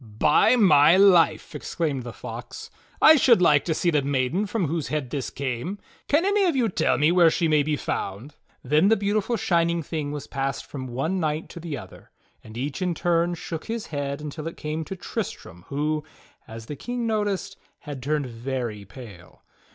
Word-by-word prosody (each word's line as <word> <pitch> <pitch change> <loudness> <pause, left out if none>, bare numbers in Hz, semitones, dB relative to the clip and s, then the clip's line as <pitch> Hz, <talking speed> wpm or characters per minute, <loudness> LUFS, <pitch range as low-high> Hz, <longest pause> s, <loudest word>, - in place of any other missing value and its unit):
"By 150 - +4
my 170 -6 +6
life!" 190 -4 +4
exclaimed 150 -6 -3
the 120 -1 -7
Fox, - - -9 0.3
"I 315 - +9
should 240 -6 +5
like 150 -5 +4
to 160 - 0
see 175 - +1
the 150 -2 +2
maiden 140 +8 0
from 205 -3 -1
whose 160 0 -2
head 145 -5 -3
this 135 -5 -3
came. 135 - -4 0.3
Can 310 +5 +2
any 405 0 +3
of 340 -5 +1
you 240 -4 +2
tell - - +1
me 150 +2 +3
where 175 -2 +6
she 165 +1 0
mav 150 -2 +3
be 155 0 0
found. 110 0 -4
^ - - -35 0.2
" - - -42
Then 150 +8 +3
the 225 +1 +4
beautiful 205 +3 0
shining 170 -3 +1
thing 150 -1 -4
was 145 -2 -5
passed 135 0 -3
from 130 -3 -7
one 140 +10 -2
knight 155 -1 -2
to - - -9
the 160 -4 -5
other, - - -12 0.3
and 110 +1 -11
each 135 +7 -4
in 180 -2 0
turn 175 0 +1
shook 165 -1 -6
his 230 -1 -4
head 140 0 -3
until 150 +1 -6
it 165 - -7
came 155 +1 -4
to 190 - -6
Tristram, 170 - -6
who, 150 +2 -1 0.4
as 115 0 -9
the 145 - -6
King 245 - -4
noticed, 205 -3 -1 0.3
had 145 -4 -7
turned 145 +1 -1
very 120 -3 -5
pale. 100 -5 -13
155 Hz, 200 wpm, -24 LUFS, 140-185 Hz, 0.4 s, I